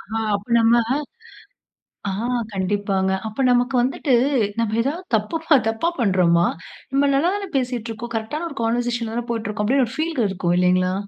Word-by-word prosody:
ஆ -, -, 0 dB, 0.2 s
அப்ப 200 Hz, 0 st, -6 dB
நம்ம 230 Hz, +1 st, +5 dB, 1.3 s
ஆ -, -, -1 dB, 0.4 s
கண்டிப்பாங்க. 190 Hz, 0 st, 0 dB, 0.2 s
அப்ப 220 Hz, +5 st, -2 dB
நமக்கு 245 Hz, +2 st, +2 dB
வந்துட்டு 265 Hz, +2 st, 0 dB, 0.5 s
நம்ம 225 Hz, -1 st, 0 dB
ஏதாவது 300 Hz, +9 st, -2 dB
தப்புபா 315 Hz, +9 st, +1 dB
தப்பா 225 Hz, +10 st, 0 dB
பண்றோமா? 180 Hz, -5 st, +3 dB, 0.4 s
நம்ம 280 Hz, +1 st, +2 dB
நல்லா 320 Hz, +7 st, +2 dB
தானே 405 Hz, -1 st, -4 dB
பேசிட்டுருக்கோம். 240 Hz, -2 st, -4 dB
கரெக்ட்டான 265 Hz, +10 st, -3 dB
ஒரு 285 Hz, -, -11 dB
கான்வர்சேஷன் 240 Hz, 0 st, -1 dB
ல 220 Hz, -, -5 dB
தானே 240 Hz, 0 st, -3 dB
போயிட்டுருக்கோம். 215 Hz, -2 st, -2 dB
அப்பிடின்னு 265 Hz, +1 st, +3 dB
ஒரு 255 Hz, -, -9 dB
ஃபீல் 320 Hz, -1 st, -2 dB
க -, -, +3 dB
இருக்கும். 175 Hz, -2 st, 0 dB
இல்லேங்ளா! 185 Hz, 0 st, +2 dB
230 Hz, 155 wpm, -22 LUFS, 205-270 Hz, 1.3 s, நம்ம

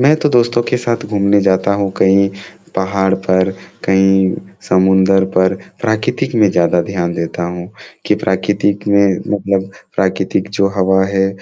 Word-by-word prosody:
मैं 140 Hz, +4 st, +5 dB
तो 150 Hz, -, +3 dB
दोस्तों 120 Hz, -2 st, +2 dB
के -, -, +2 dB
साथ 120 Hz, -1 st, -3 dB
घूमने 100 Hz, -1 st, +2 dB
जाता 95 Hz, 0 st, +1 dB
हूँ 100 Hz, -1 st, -1 dB
कहीं 100 Hz, +1 st, +3 dB, 0.5 s
पहाड़ 95 Hz, 0 st, 0 dB
पर, 95 Hz, 0 st, 0 dB, 0.3 s
कहीं 95 Hz, 0 st, +3 dB, 0.3 s
समुद्र 95 Hz, +1 st, +3 dB
पर 95 Hz, +1 st, +3 dB, 0.3 s
प्राकृतिक 110 Hz, +1 st, -1 dB
में 110 Hz, -3 st, +4 dB
ज़्यादा 85 Hz, 0 st, +2 dB
ध्यान 85 Hz, -1 st, -3 dB
देता 85 Hz, +1 st, -4 dB
हूँ 90 Hz, +2 st, -6 dB, 0.4 s
कि -, -, +3 dB
प्राकृतिक 100 Hz, +2 st, -1 dB
में 100 Hz, -2 st, +3 dB, 0.2 s
मतलब 100 Hz, -1 st, -1 dB, 0.3 s
प्राकृतिक 95 Hz, 0 st, -1 dB
जो 100 Hz, -1 st, +3 dB
हवा 95 Hz, 0 st, +2 dB
है, 95 Hz, -1 st, 0 dB
95 Hz, 145 wpm, -15 LUFS, 95-100 Hz, 0.5 s, मैं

